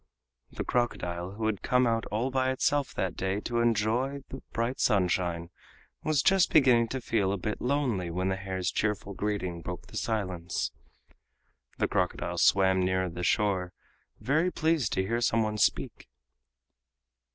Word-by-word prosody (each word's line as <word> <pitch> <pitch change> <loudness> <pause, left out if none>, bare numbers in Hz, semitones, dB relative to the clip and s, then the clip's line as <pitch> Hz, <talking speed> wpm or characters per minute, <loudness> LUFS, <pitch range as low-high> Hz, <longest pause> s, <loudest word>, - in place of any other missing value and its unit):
The - - -5
crocodile, 90 -7 -1
who 110 +2 -4
had 110 -3 -1
come 125 0 +3
out 115 -1 0
all 115 +5 -1
by 130 0 +1
itself 135 +1 +1
that 95 -2 -2
day 95 +1 -1
to 120 +1 -1
enjoy 120 +5 +1
the 135 - -7
bright 115 +3 -2
sunshine, 90 -4 +1 0.5
was 155 -3 +2
just 190 -2 +4
beginning 125 -6 +5
to 130 - -3
feel 105 -5 +1
a 100 - -1
bit 105 +3 -4
lonely 125 -9 0
when 90 +3 -1
the 95 - 0
hare's 95 -1 -3
cheerful 105 -2 -1
greeting 95 -4 -3
broke 90 +1 -6
the - - -8
silence. 90 -6 -2 1.1
The - - +1
crocodile - - -1
swam 95 -1 +4
nearer 95 0 +1
the 85 +1 -6
shore, 95 -1 +1 0.5
very 150 +11 +2
pleased 160 - +1
to 95 - +1
hear 115 +5 -1
some 115 -1 +2
one 105 0 -2
speak. 105 - 0
105 Hz, 155 wpm, -29 LUFS, 95-125 Hz, 1.1 s, beginning